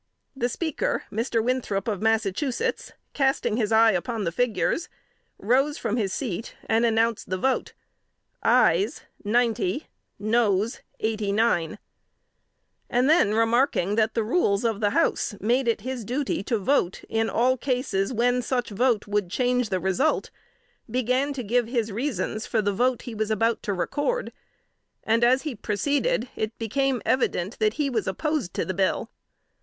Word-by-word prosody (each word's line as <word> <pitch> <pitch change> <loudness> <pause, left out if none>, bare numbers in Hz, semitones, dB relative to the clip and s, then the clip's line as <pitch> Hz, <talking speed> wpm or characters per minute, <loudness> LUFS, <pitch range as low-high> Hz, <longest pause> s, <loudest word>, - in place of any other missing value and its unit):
The 245 -2 0
Speaker, 315 +4 -2
Mr. 225 +1 0
Winthrop 240 -5 -1
of 210 -4 -2
Massachusetts, 225 +4 0 0.2
casting 270 -5 +1
his 220 -3 0
eye 225 0 +6
upon 215 +4 -2
the 170 - -1
figures, 245 - 0 0.5
rose 270 +7 +1
from 225 -2 -2
his 205 -5 0
seat, 225 -2 -4
and 225 +1 +2
announced 225 0 +1
the 185 - -1
vote 265 +7 0 0.7
"ayes 225 - +3 0.2
ninety, 225 - 0 0.3
noes 215 0 +1 0.2
eighty 215 -2 -1
nine," 210 -3 +1 1.1
and 250 +2 +2
then 290 - +4
remarking 225 -4 +2
that 220 0 +1
the 225 - +1
rules 215 - +1
of 225 -3 0
the 210 -2 +2
House 205 - +1
made 240 +5 +1
it 230 -3 +1
his 255 0 -4
duty 260 +4 -2
to 235 - +1
vote 200 -3 0
in 225 0 0
all 255 +3 +2
cases 250 -6 -1
when 245 +1 +2
such 245 -2 -2
vote 230 +1 +1
would 205 -3 -1
change 250 +2 +1
the 185 -2 0
result, 190 - 0 0.6
began 255 +4 +1
to 270 -3 -4
give 235 +2 +1
his 230 -3 -1
reasons 230 -1 -2
for 225 - 0
the 205 -1 +1
vote 245 +4 +1
he 240 - -7
was 215 0 -2
about 225 +2 +1
to - - -3
record, 290 - -1 0.7
and 225 +2 +2
as 255 +2 +4
he 305 -4 -3
proceeded 280 - 0
it 220 +1 -3
became 255 +2 -1
evident 225 -5 0
that 215 -1 +2
he 295 -1 0
was 235 -5 -1
opposed 285 - -2
to - - -1
the 185 - -2
bill. 195 +4 0
230 Hz, 155 wpm, -25 LUFS, 210-255 Hz, 1.1 s, eye